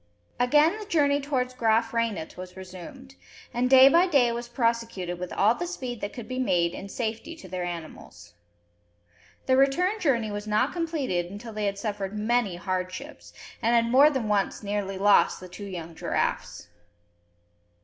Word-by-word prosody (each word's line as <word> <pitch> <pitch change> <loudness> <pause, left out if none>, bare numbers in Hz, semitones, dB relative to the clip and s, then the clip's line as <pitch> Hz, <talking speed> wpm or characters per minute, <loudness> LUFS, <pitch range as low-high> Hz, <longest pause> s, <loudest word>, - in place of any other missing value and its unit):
Again 300 - +4
the 425 - -7
journey 290 -6 +2
towards 255 -3 -1
Graaf 225 -1 +1
Reinet 230 -8 -2
was 185 0 -10
resumed, 190 +9 -10 0.4
and 250 +1 +1
day 265 0 +9
by 340 +6 +5
day 270 -8 +3
was 235 +1 -4
prosecuted 230 -7 -2
with 180 0 -5
all 210 +3 +3
the 350 +8 -4
speed 255 -9 -6
that 205 - -3
could 240 - -9
be 255 0 -4
made 175 -8 +1
in 195 - -8
safety 230 +9 -4
to 250 - -12
their 180 0 -4
animals. 155 - -8 1.1
The 260 - +3
return 360 +10 +2
journey 235 - +1
was 205 +1 -5
not 215 +6 +1
completed 295 - -2
until 205 +5 -9
they 210 -1 -1
had 200 0 -2
suffered 205 -1 -4
many 220 -3 +1
hardships, 185 - -5 0.3
and 235 +1 +2
had 230 0 +2
more 275 +4 +7
than 265 -7 -2
once 205 0 0
nearly 200 -1 -3
lost 205 +1 +4
the 185 - -10
two 200 +3 -9
young 170 -3 -7
giraffes. 125 - -2
230 Hz, 170 wpm, -26 LUFS, 195-265 Hz, 1.1 s, day